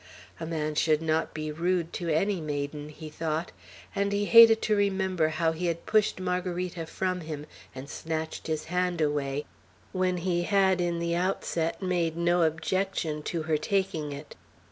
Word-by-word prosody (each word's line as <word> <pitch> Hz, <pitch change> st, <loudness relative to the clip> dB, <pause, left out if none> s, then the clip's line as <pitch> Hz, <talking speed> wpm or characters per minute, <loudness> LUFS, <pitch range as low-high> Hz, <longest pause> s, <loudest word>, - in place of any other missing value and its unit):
"A 160 Hz, -, -4 dB
man 155 Hz, -2 st, -2 dB
should 155 Hz, 0 st, +3 dB
not 160 Hz, 0 st, 0 dB
be 155 Hz, 0 st, -4 dB
rude 170 Hz, +1 st, 0 dB
to 170 Hz, -2 st, -3 dB
any 180 Hz, +4 st, +1 dB
maiden," 145 Hz, 0 st, -4 dB
he 155 Hz, +1 st, -9 dB
thought; 155 Hz, +2 st, -3 dB, 0.4 s
and 200 Hz, 0 st, +1 dB
he 205 Hz, 0 st, +1 dB
hated 230 Hz, 0 st, +9 dB
to 215 Hz, -, +2 dB
remember 190 Hz, -4 st, +1 dB
how 160 Hz, +1 st, +1 dB
he 170 Hz, +2 st, -2 dB
had 170 Hz, 0 st, -2 dB
pushed 215 Hz, -3 st, +2 dB
Margarita 180 Hz, -2 st, -2 dB
from 185 Hz, 0 st, -2 dB
him, 155 Hz, -2 st, -6 dB, 0.3 s
and 130 Hz, +1 st, -7 dB
snatched 160 Hz, +1 st, -4 dB
his 155 Hz, -1 st, -1 dB
hand 180 Hz, 0 st, -1 dB
away, 145 Hz, -2 st, 0 dB, 0.5 s
when 185 Hz, -1 st, 0 dB
he 175 Hz, 0 st, 0 dB
had 190 Hz, 0 st, +3 dB
in 175 Hz, -1 st, 0 dB
the 170 Hz, 0 st, -1 dB
outset 175 Hz, -1 st, -1 dB
made 170 Hz, -3 st, 0 dB
no 175 Hz, +1 st, +2 dB
objection 165 Hz, -1 st, 0 dB
to 165 Hz, +1 st, -3 dB
her 155 Hz, -1 st, +1 dB
taking 165 Hz, -5 st, -1 dB
it. 145 Hz, +1 st, -8 dB
170 Hz, 165 wpm, -28 LUFS, 155-185 Hz, 0.5 s, hated